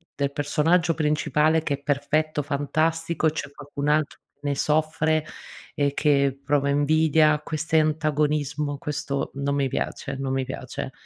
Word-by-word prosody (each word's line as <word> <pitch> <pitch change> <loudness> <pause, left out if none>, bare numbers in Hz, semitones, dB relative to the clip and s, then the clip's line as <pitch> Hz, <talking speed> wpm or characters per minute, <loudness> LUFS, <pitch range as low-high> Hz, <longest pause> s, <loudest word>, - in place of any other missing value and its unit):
del 140 -1 -1
personaggio 165 +3 +2
principale 155 +1 +2
che 145 -3 0
è 140 - -16
perfetto, 150 +2 0
fantastico, 160 +3 0
c'è 145 -2 -5
qualcun 145 0 -6
altro 150 -1 +1 0.2
che - - -46
ne 145 -1 -1
soffre 155 +1 +1 0.5
e 140 -1 +1
che 140 -2 +2
prova 140 0 +1
invidia, 155 +1 +3
queste 160 +1 0
antagonismo, 150 -1 0
questo 145 -1 -3
non 140 0 -1
mi 140 -1 +1
piace, 140 - -3
non 135 -1 -2
mi 135 0 0
piace. - - -6
150 Hz, 140 wpm, -24 LUFS, 140-155 Hz, 0.5 s, invidia